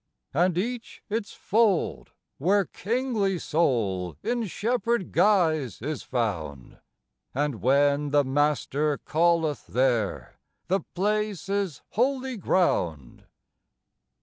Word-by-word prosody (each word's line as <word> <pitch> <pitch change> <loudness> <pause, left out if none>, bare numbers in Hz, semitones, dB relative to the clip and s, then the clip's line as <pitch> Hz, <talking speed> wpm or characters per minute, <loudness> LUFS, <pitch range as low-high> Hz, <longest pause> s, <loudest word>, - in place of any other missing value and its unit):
And 175 +3 +2
each 235 +5 -4
its 215 -1 -2
fold, 215 -5 +1 0.3
where 195 +6 +3
kingly 220 -4 -1
soul 100 - 0
in 240 -2 -1
shepherd 235 +1 -1
guise 160 - +2
is 145 +5 -4
found; 85 - -3 0.6
And 145 -4 -1
when 140 +3 +3
the 145 0 +4
Master 145 +1 +1
calleth 165 -2 +1
there 115 - 0 0.3
the 190 +2 +3 0.2
place 205 -1 -1
is 195 -7 -2
"holy 260 +2 0
ground." 85 - 0
165 Hz, 95 wpm, -26 LUFS, 130-205 Hz, 0.6 s, the